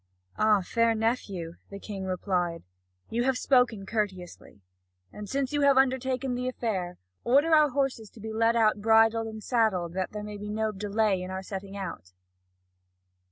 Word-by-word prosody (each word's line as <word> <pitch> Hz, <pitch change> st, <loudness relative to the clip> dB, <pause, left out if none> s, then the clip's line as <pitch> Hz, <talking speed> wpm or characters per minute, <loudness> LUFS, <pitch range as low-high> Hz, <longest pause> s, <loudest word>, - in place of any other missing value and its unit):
"Ah, 215 Hz, -2 st, +3 dB
fair 230 Hz, +4 st, +2 dB
nephew," 200 Hz, -7 st, -2 dB
the 200 Hz, -, -8 dB
King 200 Hz, -1 st, -6 dB
replied, 180 Hz, -2 st, -1 dB, 0.5 s
"you 235 Hz, +1 st, 0 dB
have 260 Hz, 0 st, +1 dB
spoken 250 Hz, -7 st, +2 dB
courteously. 190 Hz, -, -4 dB, 0.5 s
And 210 Hz, -1 st, -8 dB
since 275 Hz, 0 st, -1 dB
you 290 Hz, -, +1 dB
have 280 Hz, -1 st, +5 dB
undertaken 260 Hz, 0 st, +1 dB
the 250 Hz, +1 st, -2 dB
affair, 195 Hz, -8 st, -3 dB, 0.3 s
order 285 Hz, +7 st, +3 dB
our 305 Hz, -1 st, +6 dB
horses 260 Hz, -5 st, -2 dB
to -, -, -16 dB
be 220 Hz, +1 st, -6 dB
led 225 Hz, +1 st, +2 dB
out 215 Hz, -2 st, +3 dB
bridled 225 Hz, +1 st, +4 dB
and 220 Hz, -1 st, -8 dB
saddled 200 Hz, -8 st, +1 dB
that 185 Hz, 0 st, -2 dB
there 210 Hz, 0 st, -6 dB
may 210 Hz, 0 st, -7 dB
be 205 Hz, +1 st, -7 dB
no 220 Hz, +1 st, -1 dB
delay 205 Hz, -1 st, 0 dB
in 185 Hz, -, -6 dB
setting 195 Hz, +1 st, -7 dB
out." 165 Hz, -, -7 dB
220 Hz, 160 wpm, -28 LUFS, 195-245 Hz, 0.5 s, our